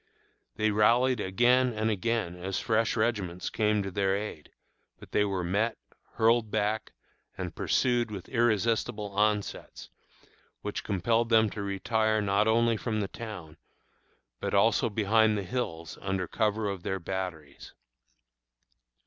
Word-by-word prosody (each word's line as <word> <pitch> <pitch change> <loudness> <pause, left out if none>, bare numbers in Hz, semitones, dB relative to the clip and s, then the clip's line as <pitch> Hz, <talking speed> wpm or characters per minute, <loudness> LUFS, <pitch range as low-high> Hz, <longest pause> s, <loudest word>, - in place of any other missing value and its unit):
They 110 0 +1
rallied 120 +4 +3
again 120 +6 +3
and 110 +1 0
again 105 -3 -1
as 95 +2 -3
fresh 110 0 +1
regiments 105 -6 -1
came 105 -2 +1
to 95 - -5
their 95 0 +1
aid, 100 -7 -6 0.5
but - - -14
they 105 - +3
were 95 -3 -1
met, 105 +6 0 0.4
hurled 115 0 +3
back, 110 +1 -1 0.4
and - - -4
pursued 120 -2 +1
with 100 -4 -7
irresistible 115 -2 0
onsets, 105 0 -1 0.7
which - - -4
compelled 115 +5 +1
them 110 -2 +4
to 105 - -5
retire 110 +2 0
not 100 +1 +2
only 115 0 +3
from 110 -1 -2
the 100 - -1
town, 95 -9 -8 0.8
but - - -2
also 115 +4 +3
behind 110 +1 +3
the 100 - -2
hills 85 - -4
under 95 -2 -2
cover 110 -1 0
of 100 -2 -4
their 95 +2 -2
batteries. 85 -5 -6
105 Hz, 135 wpm, -29 LUFS, 95-115 Hz, 0.8 s, them